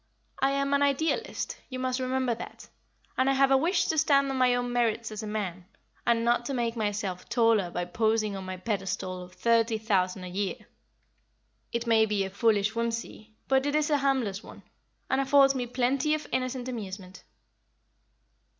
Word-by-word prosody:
I 270 Hz, -, +3 dB
am 275 Hz, 0 st, 0 dB
an 280 Hz, -, +3 dB
Idealist, 285 Hz, +3 st, 0 dB
you 255 Hz, -, -5 dB
must 255 Hz, 0 st, -1 dB
remember 255 Hz, -1 st, 0 dB
that, 230 Hz, -, -9 dB, 0.5 s
and 260 Hz, +1 st, +3 dB
I -, -, +3 dB
have 270 Hz, 0 st, +3 dB
a -, -, +7 dB
wish 335 Hz, +8 st, +2 dB
to 315 Hz, -, +1 dB
stand 280 Hz, -2 st, +3 dB
on 265 Hz, -, -2 dB
my 250 Hz, -1 st, +4 dB
own 245 Hz, 0 st, -2 dB
merits 230 Hz, -2 st, 0 dB
as 215 Hz, 0 st, -5 dB
a 215 Hz, -, -6 dB
man, 190 Hz, -4 st, -4 dB, 0.4 s
and 230 Hz, -1 st, +3 dB
not 240 Hz, 0 st, +2 dB
to 275 Hz, -, -2 dB
make 235 Hz, -1 st, -1 dB
myself 205 Hz, -4 st, -3 dB
taller 225 Hz, -5 st, +3 dB
by 175 Hz, 0 st, -3 dB
posing 215 Hz, +2 st, 0 dB
on 190 Hz, -, -6 dB
my 185 Hz, 0 st, -6 dB
pedestal 185 Hz, -2 st, -3 dB
of 180 Hz, 0 st, -11 dB
thirty 230 Hz, -1 st, +2 dB
thousand 190 Hz, -4 st, 0 dB
a -, -, -6 dB
year. 190 Hz, +2 st, -2 dB, 1.2 s
It 235 Hz, 0 st, -2 dB
may 220 Hz, -1 st, +4 dB
be 205 Hz, -2 st, 0 dB
a 190 Hz, -, -5 dB
foolish 210 Hz, +1 st, +2 dB
whimsie, 230 Hz, -1 st, -4 dB
but 265 Hz, +1 st, +2 dB
it 290 Hz, -, 0 dB
is 305 Hz, 0 st, +1 dB
a 290 Hz, -, +3 dB
harmless 260 Hz, -8 st, 0 dB
one, -, -, -13 dB, 0.4 s
and 265 Hz, +1 st, +1 dB
affords 275 Hz, 0 st, +5 dB
me 250 Hz, -2 st, -3 dB
plenty 260 Hz, +5 st, +1 dB
of 310 Hz, -, -6 dB
innocent 255 Hz, -1 st, -2 dB
amusement." 195 Hz, -6 st, -7 dB
235 Hz, 185 wpm, -28 LUFS, 205-265 Hz, 1.2 s, a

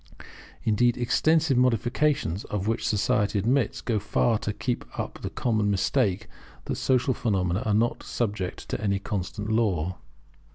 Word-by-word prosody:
Indeed 120 Hz, +2 st, +3 dB
the 125 Hz, -, -3 dB
extensive 155 Hz, +2 st, +3 dB
modifications 125 Hz, -, +1 dB
of 105 Hz, -1 st, -3 dB
which 115 Hz, -, 0 dB
society 105 Hz, -1 st, +1 dB
admits, 120 Hz, +4 st, +1 dB
go 115 Hz, -3 st, 0 dB
far 105 Hz, +2 st, +1 dB
to 105 Hz, -, -2 dB
keep 120 Hz, +4 st, -2 dB
up -, -, -4 dB
the -, -, -3 dB
common 110 Hz, -4 st, 0 dB
mistake 100 Hz, +1 st, +1 dB, 0.4 s
that -, -, -3 dB
social 130 Hz, 0 st, +2 dB
phenomena 95 Hz, -5 st, 0 dB
are 105 Hz, -, +2 dB
not 115 Hz, +3 st, +1 dB
subject 100 Hz, -6 st, -3 dB
to -, -, -3 dB
any 100 Hz, -2 st, +1 dB
constant 105 Hz, +1 st, -4 dB
law. 95 Hz, -6 st, 0 dB
110 Hz, 150 wpm, -26 LUFS, 100-120 Hz, 0.4 s, Indeed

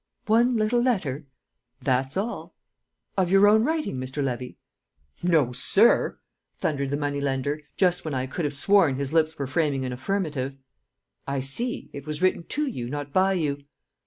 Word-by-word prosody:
"One 235 Hz, +3 st, +3 dB
little 220 Hz, +3 st, +2 dB
letter?" 160 Hz, -, -1 dB, 0.5 s
"That's 130 Hz, +3 st, 0 dB
all." 215 Hz, +5 st, -4 dB, 0.6 s
"Of 185 Hz, -3 st, +1 dB
your 195 Hz, +2 st, +6 dB
own 220 Hz, +1 st, +5 dB
writing, 310 Hz, -, -1 dB
Mr. 130 Hz, +3 st, -3 dB
Levy?" 125 Hz, -1 st, -4 dB, 0.6 s
"No, 160 Hz, -8 st, +3 dB
sir!" 125 Hz, -, +3 dB, 0.4 s
thundered 140 Hz, -3 st, -1 dB
the 145 Hz, -, -1 dB
money 145 Hz, -1 st, -2 dB
lender, 140 Hz, +2 st, -1 dB, 0.2 s
just 180 Hz, -2 st, +2 dB
when 155 Hz, -3 st, -3 dB
I 130 Hz, 0 st, -1 dB
could 150 Hz, +5 st, -3 dB
have 145 Hz, -1 st, -2 dB
sworn 175 Hz, -2 st, +4 dB
his 140 Hz, +2 st, -3 dB
lips 160 Hz, -1 st, +2 dB
were 140 Hz, -, -2 dB
framing 140 Hz, -1 st, 0 dB
an 125 Hz, -, -3 dB
affirmative. 140 Hz, -2 st, -2 dB, 0.7 s
"I 140 Hz, 0 st, -1 dB
see; 230 Hz, -, -3 dB
it 140 Hz, +1 st, -8 dB
was 150 Hz, -1 st, -3 dB
written 185 Hz, -2 st, +1 dB
to 300 Hz, +1 st, -1 dB
you, 125 Hz, -, -4 dB
not 145 Hz, 0 st, -5 dB
by 190 Hz, +1 st, +4 dB
you." 145 Hz, -5 st, -1 dB
150 Hz, 165 wpm, -25 LUFS, 135-195 Hz, 0.7 s, your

